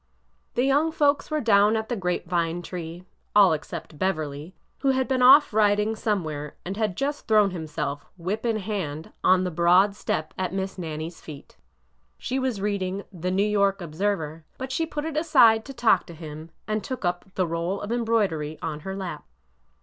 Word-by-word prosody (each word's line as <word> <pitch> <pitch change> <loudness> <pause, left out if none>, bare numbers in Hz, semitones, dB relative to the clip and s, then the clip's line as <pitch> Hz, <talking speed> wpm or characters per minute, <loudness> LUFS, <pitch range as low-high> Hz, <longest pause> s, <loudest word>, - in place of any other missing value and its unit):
The 245 - +2
young 290 +4 +3
folks 290 -2 +2
were 305 -1 0
down 210 -2 +4
at 220 0 -2
the 240 - -2
grape 180 -3 -2
vine 170 0 -1
tree, 175 -1 -7 0.2
— - - -44
all 200 -5 +7
except 150 0 -6
Beverly, 155 -2 -2 0.2
who 275 - +1
had 260 - +1
been 260 -1 +1
off 265 +1 +7
riding 210 +1 +3
somewhere 155 -10 -2
and 190 +2 -4
had 210 -4 -1
just 290 +1 -2
thrown 210 -3 +4
himself, 150 -4 -4
whip 190 +6 -3
in 230 -2 +1
hand, 185 -7 -4
on 185 0 +5
the 180 - -2
broad 180 +4 +4
step 155 -6 -3
at 185 0 -2
Miss 190 0 -3
Nannie's 160 0 -5
feet. 150 -3 -11 0.6
She 260 +2 -2
was 260 -5 -1
reading 200 -1 -2
The 180 0 -3
New 195 +2 +2
York 200 -1 +2
Observer," 165 -2 -2
but 260 0 -5
she 325 +5 0
put 300 -1 -4
it 320 -2 -4
aside 245 -9 +5
to 275 - -8
talk 235 -3 +3
to 170 - -10
him, 155 0 -9 0.2
and 215 -1 -1
took 255 -2 -5
up 175 0 -1
the 185 - +1
roll 170 +4 -2
of 205 - -5
embroidery 205 -11 0
on 155 -2 -4
her 190 +5 -6
lap. 190 -2 -5
195 Hz, 190 wpm, -25 LUFS, 165-220 Hz, 0.6 s, all